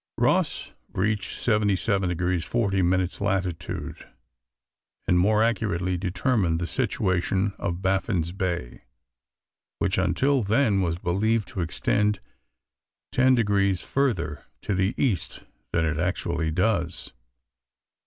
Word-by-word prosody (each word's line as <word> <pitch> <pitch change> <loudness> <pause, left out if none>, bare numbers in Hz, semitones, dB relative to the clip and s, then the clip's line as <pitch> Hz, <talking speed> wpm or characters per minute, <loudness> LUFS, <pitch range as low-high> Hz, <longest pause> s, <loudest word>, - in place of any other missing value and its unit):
Ross - - +1 0.2
reached 105 +2 -1
77 105 -3 +1
deg. 90 0 0
40 100 -4 0
min. 90 +1 +2
latitude, 95 -4 -3 1.0
and 90 - +4
more 105 +4 +4
accurately 95 -5 0
determined 90 -1 0
the 85 - -2
situation 95 -3 0
of 90 -1 -3
Baffin's 95 -3 0
Bay, 85 -9 -3 1.0
which 95 - 0
until 130 +10 +2
then 105 -1 +2
was 85 -2 0
believed 105 +5 0
to 95 - -4
extend 105 +5 0 0.9
10 130 0 +4
deg. 100 -4 +2
further 100 - -1 0.2
to 105 - -2
the 95 +2 +1
east 115 -10 -1 0.3
than 80 -1 +1
it 80 -1 -1
actually 85 -2 -1
does. 85 -1 -1
95 Hz, 110 wpm, -25 LUFS, 90-105 Hz, 1.0 s, and